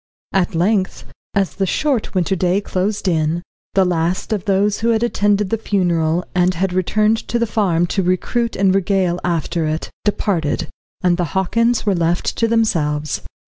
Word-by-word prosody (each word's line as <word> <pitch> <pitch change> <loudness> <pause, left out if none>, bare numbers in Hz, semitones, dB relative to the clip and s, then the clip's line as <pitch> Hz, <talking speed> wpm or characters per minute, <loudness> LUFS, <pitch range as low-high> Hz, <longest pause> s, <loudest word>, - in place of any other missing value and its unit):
At 180 -3 +1
length, 190 +3 0 0.3
as 195 -2 +1
the 195 -1 0
short 265 - -1
winter 185 +1 +1
day 180 +1 +1
closed 200 +1 -2
in, 165 0 0 0.3
the 190 -1 +4
last 175 +4 -1
of 205 -4 -3
those 200 +1 +1
who 230 - +1
had 225 0 +2
attended 205 -4 +1
the 225 - 0
funeral, 175 -5 0
and 180 0 +2
had 185 +1 -1
returned 210 +4 +2
to 240 - 0
the 235 - +1
farm 190 -6 +1
to 195 - +1
recruit 205 +6 0
and 195 -1 +3
regale 190 -2 +1
after 170 -1 -1
it, 155 +1 -3
departed, 180 -7 -1 0.3
and 175 -1 +3
the 175 -3 -3
Hockins 230 +5 +1
were 205 - +2
left 170 0 0
to 230 - +2
themselves. 160 -10 0
190 Hz, 170 wpm, -19 LUFS, 175-210 Hz, 0.3 s, the